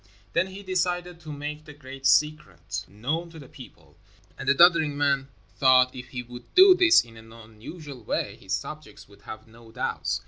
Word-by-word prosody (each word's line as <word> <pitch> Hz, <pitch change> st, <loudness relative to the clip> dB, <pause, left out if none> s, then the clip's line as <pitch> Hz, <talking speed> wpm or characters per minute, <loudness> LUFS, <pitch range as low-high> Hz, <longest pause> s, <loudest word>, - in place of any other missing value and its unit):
Then 170 Hz, +2 st, +1 dB
he 190 Hz, +1 st, -10 dB
decided 180 Hz, -2 st, -2 dB
to 155 Hz, -2 st, -10 dB
make 150 Hz, +1 st, -7 dB
the 145 Hz, -, -12 dB
great 135 Hz, -1 st, -5 dB
secret 105 Hz, -, 0 dB
known 140 Hz, -, -4 dB
to 165 Hz, -, -13 dB
the 140 Hz, -4 st, -12 dB
people, 75 Hz, -, -16 dB, 0.4 s
and -, -, -4 dB
the 140 Hz, -, +4 dB
doddering 170 Hz, -2 st, +5 dB
old -, -, -8 dB
man 140 Hz, -2 st, +1 dB, 0.3 s
thought 130 Hz, -1 st, +4 dB
if 125 Hz, 0 st, -9 dB
he 125 Hz, -1 st, -6 dB
would 120 Hz, 0 st, -13 dB
do 375 Hz, +1 st, +9 dB
this 355 Hz, -2 st, +5 dB
in 115 Hz, -1 st, -16 dB
an 110 Hz, 0 st, -15 dB
unusual 115 Hz, +5 st, -11 dB
way, -, -, -3 dB
his -, -, -6 dB
subjects -, -, -9 dB
would -, -, -20 dB
have 110 Hz, +1 st, -10 dB
no 115 Hz, 0 st, -17 dB
doubts. -, -, -3 dB
140 Hz, 195 wpm, -25 LUFS, 115-165 Hz, 0.4 s, do